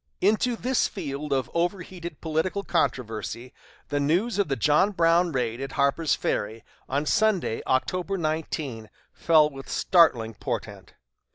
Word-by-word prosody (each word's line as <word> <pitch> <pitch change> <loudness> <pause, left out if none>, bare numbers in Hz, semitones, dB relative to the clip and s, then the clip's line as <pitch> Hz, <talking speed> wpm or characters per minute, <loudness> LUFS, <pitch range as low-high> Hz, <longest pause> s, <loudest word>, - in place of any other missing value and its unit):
Into 220 +5 +2
this 255 +2 +1
field 150 -5 -5
of 135 -2 +1
overheated 175 -1 -3
political 165 +5 -1
controversy 125 - -2 0.4
the 145 - 0
news 180 +10 +1
of 200 - +2
the 135 - 0
John 150 - +3
Brown 170 -2 +3
raid 120 -3 -2
at 135 0 -5
Harper's 140 +2 +2
Ferry 110 +2 -2 0.3
on 140 +3 0
Sunday, 215 - +1
October 180 +9 0
19, 155 - -3 0.2
fell 155 -2 +4
with 135 -2 -10
startling 125 -11 +3
portent. - - -6
155 Hz, 130 wpm, -26 LUFS, 135-180 Hz, 0.4 s, fell